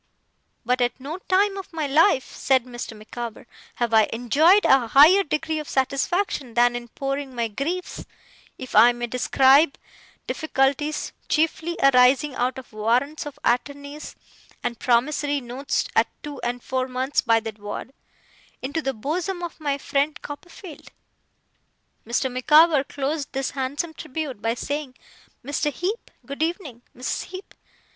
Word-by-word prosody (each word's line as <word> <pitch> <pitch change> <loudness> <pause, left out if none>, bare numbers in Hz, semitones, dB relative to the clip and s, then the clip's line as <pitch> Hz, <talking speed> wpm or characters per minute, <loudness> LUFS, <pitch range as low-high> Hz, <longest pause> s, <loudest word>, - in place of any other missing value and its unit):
But 250 +2 +1
at 245 +1 0
no 300 +7 -6
time 390 +1 +3
of 385 - -8
my 320 -3 -2
life,' 285 0 +3
said 260 -2 +2
Mr. 240 -3 -7
Micawber, 230 +1 -7 0.3
'have 235 -2 -1
I 220 -1 +5
enjoyed 295 - +4
a 265 -3 +4
higher 305 - +7
degree 315 -1 -2
of 300 - -7
satisfaction 275 - -1
than 240 0 +4
in 240 0 -5
pouring 275 +1 -4
my 235 -1 0
griefs 310 - -4 0.5
(if 255 - -8
I 240 +1 +8
may 240 0 -4
describe 270 +5 +4 0.5
difficulties, 295 0 -1 0.2
chiefly 325 +2 0
arising 265 +2 +5
out 255 +1 -1
of 260 -4 -11
warrants 245 +9 0
of 290 -1 -9
attorney 285 +4 -1 0.6
and 235 - -3
promissory 285 +4 +1
notes 255 +2 -2
at - - +4 0.2
two 295 -2 -7
and 240 0 -3
four 260 0 -1
months, 260 +2 0
by 230 -2 +3
that 220 -1 -7
word) 205 +5 -7 0.7
into 285 +5 -3
the 270 -3 -2
bosom 350 - -3
of 340 -1 -6
my 285 -2 -1
friend 285 +2 -1
Copperfield.' 330 +3 -10 1.2
Mr. 255 +2 0
Micawber 300 +3 +5
closed 285 +2 -3
this 270 0 -2
handsome 285 +5 -3
tribute 275 -6 -6
by 225 +2 0
saying, 285 0 -4 0.5
'Mr. 290 +1 -1
Heep! 385 - -4 0.2
Good 280 +2 -7
evening. 320 - -3 0.2
Mrs. 250 -1 -3
Heep! 375 +2 -10
275 Hz, 145 wpm, -24 LUFS, 245-310 Hz, 1.2 s, I